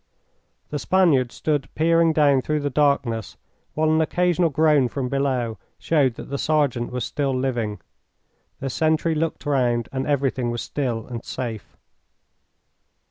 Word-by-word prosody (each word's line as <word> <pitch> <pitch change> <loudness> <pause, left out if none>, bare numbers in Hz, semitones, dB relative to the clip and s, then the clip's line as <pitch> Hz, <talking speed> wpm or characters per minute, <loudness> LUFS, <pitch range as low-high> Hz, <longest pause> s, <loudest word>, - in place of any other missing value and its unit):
The 145 - -2
Spaniard 150 -9 +3
stood 145 -3 -2
peering 165 +1 +3
down 145 -4 +3
through 150 +2 -1
the 145 0 -2
darkness, 130 -7 0 0.4
while 155 0 +2
an 160 0 +3
occasional 175 +1 +2
groan 150 -3 +3
from 125 +1 -3
below 130 -5 -1 0.2
showed 140 -7 +1
that - - -9
the 140 - -2
sergeant 145 -6 0
was 125 0 -2
still 135 -3 -1
living. 120 -5 -2 0.8
The 135 -1 -2
sentry 160 +2 +1
looked 160 0 -2
round 120 -5 +1
and 130 0 -3
everything 135 -4 0
was 120 0 -3
still 120 -6 -3
and 120 -2 -7
safe. 115 -5 -6
140 Hz, 140 wpm, -23 LUFS, 125-155 Hz, 0.8 s, Spaniard